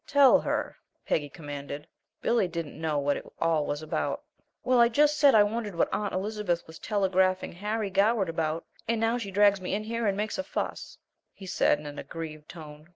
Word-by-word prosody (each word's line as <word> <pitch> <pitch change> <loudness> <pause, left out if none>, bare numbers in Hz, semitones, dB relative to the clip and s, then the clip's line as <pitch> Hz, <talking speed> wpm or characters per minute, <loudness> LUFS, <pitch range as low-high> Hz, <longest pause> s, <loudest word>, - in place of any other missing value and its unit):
"Tell 280 -2 +6
her," - - -2 0.3
Peggy 145 -2 0
commanded. 145 -1 -7 0.4
Billy 230 -5 +2
didn't 165 -3 -6
know 155 -2 0
what 145 0 +1
it - - -8
all 160 -3 +1
was 145 +1 -3
about. 155 - -2 0.4
"Why, 255 0 +3
I 235 0 +6
just 295 +5 +3
said 280 -5 +6
I 210 - +8
wondered 210 -2 -3
what - - +1
Aunt 205 -1 -1
Elizabeth 190 -2 -2
was 160 0 -12
telegraphing 190 -2 +1
Harry 210 +2 -3
Goward 200 +1 +3
about, 165 0 -2 0.2
and 230 -1 +1
now 225 +2 +1
she 205 -4 -5
drags 200 0 +4
me 185 - -2
in 210 - -3
here 230 0 -2
and 195 -1 0
makes 215 +6 -2
a - - 0
fuss," - - -4 0.4
he 195 - -11
said, 180 - +2
in 150 - -11
an 145 0 -7
aggrieved 155 -2 -7
tone. 155 -1 -11
190 Hz, 200 wpm, -28 LUFS, 160-220 Hz, 0.4 s, I